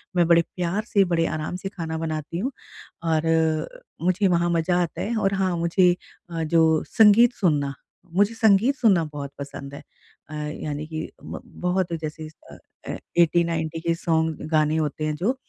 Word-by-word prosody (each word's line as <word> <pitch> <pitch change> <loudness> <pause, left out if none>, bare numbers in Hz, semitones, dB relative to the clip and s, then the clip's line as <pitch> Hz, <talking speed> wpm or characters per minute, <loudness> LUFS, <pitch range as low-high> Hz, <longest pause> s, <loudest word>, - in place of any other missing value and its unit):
मैं 175 -2 +3
बड़े 170 0 +6
प्यार 180 +4 -1
से, 205 -4 +3
बड़े 170 -2 +1
आराम 155 +2 -3
से 190 +2 -5
खाना 165 -5 -5
बनाती 160 0 -4
हूँ। 245 +10 -2 0.5
और 160 -1 +1 0.3
मुझे 185 +4 +2
वहाँ 175 -1 +2
मज़ा 170 +1 +1
आता 170 - -5
है 230 +3 -2
और 195 -2 +1
हाँ 185 -2 0
मुझे 175 +2 +3 0.4
अ, 165 -1 -2
जो 160 0 +3
संगीत 225 +3 +6
सुनना 145 -9 0 0.4
मुझे 205 +4 +3
संगीत 225 +4 +4
सुनना 205 -10 +3
बहुत 140 -1 -6
पसंद 140 0 -7
है। 140 - -8 0.5
अ, - - -9
यानी 150 0 -4
कि 160 0 -5
ब - - -7
बहुत 180 -1 -2
जैसे 155 0 -6 0.2
अ, - - -11 0.3
ए - - -3 0.2
80-90 165 -1 +1
के 170 0 +1
सॉन्ग, 160 -2 0
गाने 155 -1 +2
होते 155 0 -2
हैं 155 - -1
जो 205 - 0
165 Hz, 170 wpm, -24 LUFS, 155-185 Hz, 0.5 s, बड़े